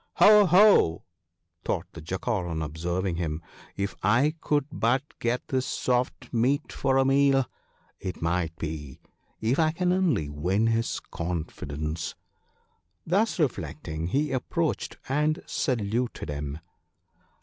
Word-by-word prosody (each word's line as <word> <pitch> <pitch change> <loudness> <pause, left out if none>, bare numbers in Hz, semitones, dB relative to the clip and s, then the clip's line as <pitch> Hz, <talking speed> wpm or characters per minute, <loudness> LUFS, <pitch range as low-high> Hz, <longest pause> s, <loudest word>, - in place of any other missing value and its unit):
" - - -54
Ho! 210 -1 +7
ho! 180 - +5 0.3
" 85 0 -52
thought 90 -1 -1
the 85 - -8
Jackal 95 +4 -2
on 80 -2 -2
observing 85 +4 -2
him, 80 -3 -2 0.2
" - - -19
if 100 0 -1
1 120 +10 +4
could 145 -2 +1
but 125 +4 +1 0.2
get 120 +1 -1
this 130 -1 0
soft 125 0 -1
meat 125 +5 +1
for 135 -1 +1
a 135 - +4
meal! 135 -1 +4 0.5
It 95 -2 -5
might 85 -1 -1
be 75 -5 -6 0.2
— - - -41
if 135 - +1
I 160 -1 +4
can 180 +2 +1
only 165 - +1
win 90 +9 0
his 115 0 0
confidence." 80 -2 -4 0.9
Thus 200 +7 +1
reflecting 80 - -2
he 145 - 0
approached, 155 +5 -1
and 150 +3 +1
saluted 120 - -1
him. 70 0 -4
110 Hz, 140 wpm, -27 LUFS, 80-140 Hz, 0.9 s, Ho